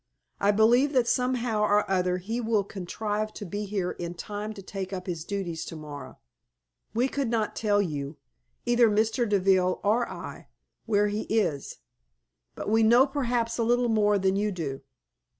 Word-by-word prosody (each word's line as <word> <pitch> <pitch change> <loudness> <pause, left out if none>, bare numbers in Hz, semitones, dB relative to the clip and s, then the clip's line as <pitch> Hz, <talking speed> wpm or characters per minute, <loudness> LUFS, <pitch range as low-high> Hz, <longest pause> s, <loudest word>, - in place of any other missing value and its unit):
I 200 - +2
believe 235 +7 +4
that 250 -3 +3
somehow 250 -4 +1
or 210 0 +3
other 180 -1 +1
he 220 +7 -3
will 220 -3 +1
contrive 210 +3 -3
to 205 - -6
be 205 +3 -4
here 195 -3 -2
in 175 0 -6
time 210 +4 -5
to 195 - -9
take 190 0 -5
up 185 -2 -5
his 170 -4 -4
duties 175 -4 -4
to - - -7
morrow. 150 -2 -9 0.8
We 245 +3 +3
could 275 -1 -2
not 225 -2 -1
tell 205 -2 +2
you 145 -3 -4 0.5
either 240 -1 +4
Mr. 220 +2 +1
Deville 185 -2 +3
or 225 +4 +2
I - - -8 0.4
where 210 -1 +3
he 210 +1 -3
is, 180 -11 0 0.8
but - - -6
we 220 +2 +3
know 235 +4 +6
perhaps 245 -4 -1
a - - +3
little 240 +1 +2
more 210 -2 +3
than 190 0 +1
you 210 +1 0
do. 150 -7 -4
210 Hz, 170 wpm, -27 LUFS, 185-230 Hz, 0.8 s, know